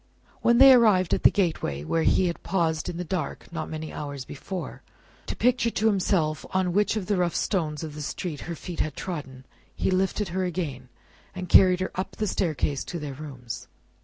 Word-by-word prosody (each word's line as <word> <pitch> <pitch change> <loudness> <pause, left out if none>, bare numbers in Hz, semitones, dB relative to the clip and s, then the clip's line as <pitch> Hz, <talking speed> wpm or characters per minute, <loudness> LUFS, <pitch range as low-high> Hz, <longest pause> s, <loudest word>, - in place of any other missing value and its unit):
When 235 0 +4
they 270 +1 +10
arrived 210 -7 +4
at - - +1
the - - +8
gateway 155 - -1
where 165 - 0
he 185 - +3
had 170 -1 -2
paused 165 -4 0
in 170 - -5
the 180 - -2
dark 180 +2 -4
not 160 -2 -4
many 155 0 -6
hours 140 -3 -5
before, 180 +8 -6 0.5
to - - -3
picture 245 -1 +2
to 220 - -2
himself 180 -7 +1
on 185 -2 +1
which 210 +3 +2
of 210 -4 -2
the 205 +1 0
rough 175 -2 0
stones 155 -5 -1
of 155 -2 -6
the 150 - -7
street 150 +1 -4
her 170 - -3
feet 175 +1 -8
had 155 -2 -1
trodden, 135 -8 -6 0.3
he - - 0
lifted 190 +2 0
her 185 +2 -1
again, 155 -9 -4 0.5
and 185 -1 -5
carried 185 0 +6
her 185 - -2
up 185 - -4
the 215 - -1
staircase 155 -7 -1
to 175 - -5
their 150 -3 -5
rooms. 125 -4 -8
175 Hz, 200 wpm, -26 LUFS, 150-190 Hz, 0.5 s, they